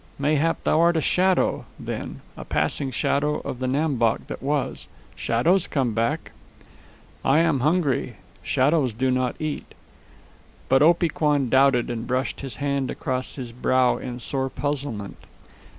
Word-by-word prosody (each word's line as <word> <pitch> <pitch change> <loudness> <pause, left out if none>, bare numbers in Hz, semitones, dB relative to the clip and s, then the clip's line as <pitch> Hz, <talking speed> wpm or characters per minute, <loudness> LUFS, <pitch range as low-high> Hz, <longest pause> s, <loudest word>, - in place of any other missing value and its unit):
"Mayhap 150 +3 +1
thou 155 - +2
art 170 0 +4
a - - +3
shadow, 185 +4 +2
then, - - -6
a - - -8
passing 140 - -1
shadow 145 +4 0
of 125 - -6
the 130 - -1
Nam 140 +1 0
Bok 115 -1 +1
that - - -7
was. 145 +1 -2 0.3
Shadows 165 +11 +2
come 130 -6 0
back." 115 +1 -1 0.9
"I 135 - +4
am 165 -4 +3
hungry. 150 0 +1 0.3
Shadows 135 -3 +1
do 130 +2 +1
not 130 -1 0
eat." 155 -1 -5 0.9
But 135 +1 +5
Opee 170 +2 +4
Kwan 150 -6 +1
doubted, 130 -2 +3
and 115 0 -4
brushed 130 +1 -1
his 135 -5 -7
hand 140 -2 -1
across 130 -1 -3
his 125 -4 -6
brow 125 +1 +2
in 125 -1 -6
sore 135 +1 -2
puzzlement. 130 -7 -4
135 Hz, 150 wpm, -24 LUFS, 125-150 Hz, 0.9 s, But